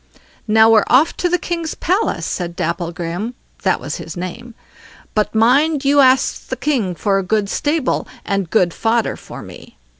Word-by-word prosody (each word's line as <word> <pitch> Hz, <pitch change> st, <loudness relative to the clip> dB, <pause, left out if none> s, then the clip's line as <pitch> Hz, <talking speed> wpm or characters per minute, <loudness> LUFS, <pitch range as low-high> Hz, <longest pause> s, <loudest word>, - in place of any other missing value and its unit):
"Now 220 Hz, +1 st, +6 dB
we're 220 Hz, -2 st, +6 dB
off 280 Hz, +6 st, +4 dB
to 355 Hz, -, 0 dB
the 360 Hz, -, +2 dB
king's 335 Hz, -3 st, -4 dB
palace", 380 Hz, +7 st, 0 dB
said 175 Hz, -2 st, -4 dB
Dapplegrim—that 175 Hz, +6 st, -3 dB
was -, -, -5 dB
his -, -, -8 dB
name; 225 Hz, +7 st, -7 dB, 0.6 s
"but 210 Hz, +1 st, 0 dB
mind 275 Hz, +6 st, +3 dB
you 285 Hz, +1 st, +4 dB
ask 260 Hz, -1 st, +3 dB
the 260 Hz, -, -3 dB
king 245 Hz, -9 st, -1 dB
for 195 Hz, +4 st, +1 dB
a -, -, -2 dB
good 210 Hz, +2 st, 0 dB
stable 295 Hz, -2 st, 0 dB, 0.2 s
and 195 Hz, -4 st, -1 dB
good 175 Hz, -4 st, +2 dB
fodder 230 Hz, 0 st, 0 dB
for -, -, -10 dB
me." -, -, -13 dB
225 Hz, 160 wpm, -18 LUFS, 190-280 Hz, 0.6 s, Now